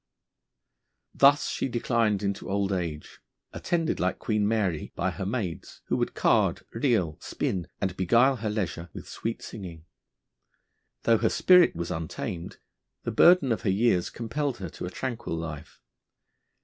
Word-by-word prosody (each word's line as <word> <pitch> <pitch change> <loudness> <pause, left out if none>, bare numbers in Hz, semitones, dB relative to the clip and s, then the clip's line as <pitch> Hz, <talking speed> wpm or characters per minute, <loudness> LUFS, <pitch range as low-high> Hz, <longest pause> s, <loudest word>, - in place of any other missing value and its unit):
Thus 140 +1 +5
she - - -1
declined 115 -4 0
into 100 -1 -3
old 100 0 0
age, 85 -5 -4 0.3
attended, 165 -2 -1
like - - 0
Queen 105 -3 0
Mary, 100 -8 -1
by 95 +2 0
her 95 +2 -5
maids, 100 -7 -4
who - - +1
would - - -1
card, - - +2
reel, 110 - +1
spin, 90 -3 -2
and 95 -2 -2
beguile 120 +9 +3
her 110 -1 -3
leisure 90 -5 -3
with - - -9
sweet 115 +1 -4
singing. 85 -7 -8 1.2
Though 115 -1 +4
her 115 - +2
spirit 180 -2 +5
was 85 0 -4
untamed, 80 +1 -5 0.5
the - - -2
burden 170 -7 +6
of 115 - 0
her 100 - 0
years 95 -2 +2
compelled 125 +3 -3
her 95 -3 -6
to 90 - -6
a - - -4
tranquil 120 -5 -4
life. 80 -3 -7
105 Hz, 150 wpm, -27 LUFS, 90-120 Hz, 1.2 s, burden